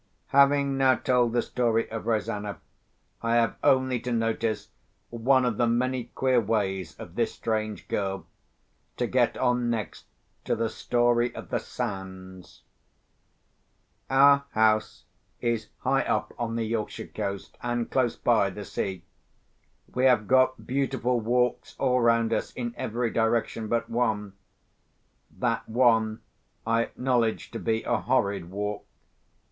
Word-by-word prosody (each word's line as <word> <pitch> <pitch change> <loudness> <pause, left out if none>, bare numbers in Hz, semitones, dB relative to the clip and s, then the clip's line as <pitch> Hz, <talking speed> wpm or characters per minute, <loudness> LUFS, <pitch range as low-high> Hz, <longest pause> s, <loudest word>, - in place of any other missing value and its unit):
Having 140 0 +4
now 130 -1 +5
told 125 -2 +2
the 120 0 +1
story 115 -2 0
of 110 -1 -5
Rosanna, 105 -2 -1 0.6
I 115 0 +1
have 115 -1 +3
only 130 -1 +3
to 125 +2 -4
notice 115 -2 -1 0.4
one 125 +3 +3
of 115 -4 0
the 120 - +2
many 125 +1 0
queer 130 -2 +3
ways 95 -6 -1
of - - -10
this - - -1
strange 110 -2 -3
girl 95 -1 -2 0.7
to - - 0
get - - +1
on 125 -1 +1
next 115 -2 -4 0.4
to - - +1
the 115 0 -1
story 120 0 +1
of - - -8
the - - 0
sands. 95 -5 -7 1.5
Our 140 +1 +6
house 110 0 +2 0.4
is 115 -3 -1
high - - +2
up - - -1
on 115 -1 -2
the 115 -1 -1
Yorkshire 110 -1 -3
coast, 100 0 -4
and 120 -1 -1
close 125 -3 +1
by 110 -5 +2
the 100 +1 -8
sea. 95 -3 -4 0.9
We 125 +1 +1
have 120 -6 +4
got 130 0 +3
beautiful 130 -2 0
walks 125 +2 0
all 125 -2 +2
round 115 -1 +3
us, - - -1
in 120 -2 -4
every 115 +1 -2
direction 115 -1 0
but 115 +1 0
one. 110 -4 -1 1.0
That - - -1
one 115 -2 +3 0.4
I 115 +1 +2
acknowledge 120 -4 -1
to - - -5
be 115 0 -1
a - - +1
horrid 100 -8 0
walk. 105 +2 -4
115 Hz, 140 wpm, -27 LUFS, 110-125 Hz, 1.5 s, Our